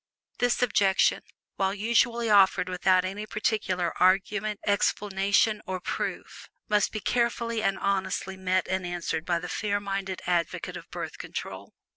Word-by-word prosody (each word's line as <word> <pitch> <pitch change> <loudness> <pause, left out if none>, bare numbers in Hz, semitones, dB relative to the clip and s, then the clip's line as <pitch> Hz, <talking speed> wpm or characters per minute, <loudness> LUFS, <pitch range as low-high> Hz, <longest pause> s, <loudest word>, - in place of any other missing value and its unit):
This 245 0 +2
objection, 200 -5 +3 0.4
while 195 0 0
usually 235 +2 +2
offered 195 -3 +4
without 185 0 +2
any 205 +3 -5
particular 195 -6 -1
argument, 200 +3 +2
explanation, 205 +1 +2
or 185 0 -3
proof, - - -5 0.2
must 210 -1 +2
be 215 - -3
carefully 235 0 0
and 195 -2 +1
honestly 190 -1 -1
met 185 -1 0
and 190 0 -1
answered 175 -2 -3
by 175 -1 +2
the 175 +1 -5
fair 205 +1 -1
minded 195 -2 -4
advocate 175 -1 -1
of - - -10
Birth - - -6
Control. - - -7
195 Hz, 140 wpm, -27 LUFS, 185-210 Hz, 0.4 s, offered